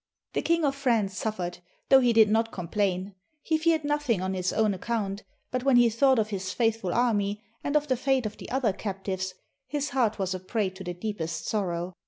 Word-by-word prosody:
The - - 0
King 335 -1 +2
of 275 - +2
France 230 -8 +1
suffered, 185 -4 -3 0.3
though 270 - +8
he 245 -2 +3
did 225 -1 +6
not 225 +1 +2
com 180 -3 -6
plain; 195 -1 0 0.3
he 315 -1 +1
feared 320 -1 +2
nothing 290 -7 0
on 190 +1 -2
his 185 -1 -1
own 215 -2 +2
account, 200 0 -2 0.3
but 255 -1 -1
when 270 -2 +4
he 240 -1 +6
thought 260 +3 +4
of 215 -1 0
his 190 -2 -3
faithful 225 -5 0
army, 210 -3 +1 0.2
and 285 - -2
of 300 0 +3
the 260 - +2
fate 265 0 +1
of 215 - -4
the - - -9
other 250 -6 +1
captives, 190 -2 -4 0.3
his 290 -1 -2
heart 235 -5 +1
was 190 -2 -1
a 185 - -4
prey 195 +1 -1
to 190 +1 -10
the 175 -1 -5
deepest 175 -4 -4
sor 210 -3 0
row. 175 +1 -3
215 Hz, 220 wpm, -27 LUFS, 190-255 Hz, 0.3 s, though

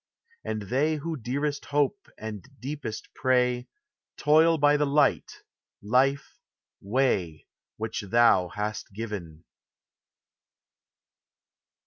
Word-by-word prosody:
And 110 -1 -3
they 140 +9 +1
who 160 +2 -4
dearest 140 +3 -3
hope 145 +8 0
and 110 -3 -7 0.2
deepest 140 -4 -6
pray, 125 -1 +1 0.5
Toil 160 +2 +4
by 145 0 +4
the 150 0 +1
Light, 145 +1 +1 0.4
Life, 130 +6 +1 0.4
Way, 100 -8 0 0.3
which 110 -1 -4
thou 115 -5 +5
hast 105 +3 -4
given. 95 -7 -6
125 Hz, 90 wpm, -27 LUFS, 105-145 Hz, 0.5 s, thou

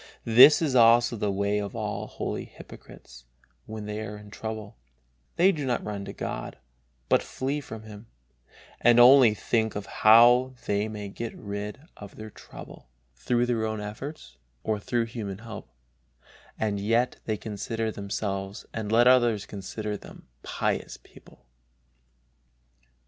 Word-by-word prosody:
This 125 +8 +8
is 145 -4 0
also 120 0 +5
the 105 -2 -1
way 100 +1 0
of 100 -1 -5
all - - -4
holy - - -5
hypocrites 65 -1 -14 0.4
when 110 -1 -7
they 105 +1 -4
are 105 -1 -6
in 105 0 -13
trouble: 110 -1 -6 0.6
they 185 +3 +5
do 150 -6 -4
not 125 -3 -1
run 100 -2 -5
to - - -6
God, - - -6 0.5
but - - +3
flee 140 +3 -3
from 110 -5 -9
Him, 110 0 -12 0.7
and 120 0 +5
only 125 -3 +8
think 110 0 -1
of 100 -1 -4
how 120 +4 +5
they 105 +1 0
may 105 -2 -6
get 115 +3 -6
rid 100 +3 -6 0.2
of 100 -1 -11
their 110 0 -9
trouble - - -13 0.3
through 120 - 0
their 120 -2 -1
own 110 -1 -2
efforts 105 - -8 0.3
or 110 -1 -1
through 115 +3 -1
human 110 -5 -6
help, 110 - -10 0.9
and 105 -2 -1
yet 115 +5 +1
they 110 -1 -1
consider 110 +2 -4
themselves 100 -1 -4
and 110 -2 -4
let 120 +2 +5
others 120 -5 +4
consider 105 +1 -5
them - - -14
pious - - -3
people. - - -20
110 Hz, 145 wpm, -26 LUFS, 105-120 Hz, 0.9 s, This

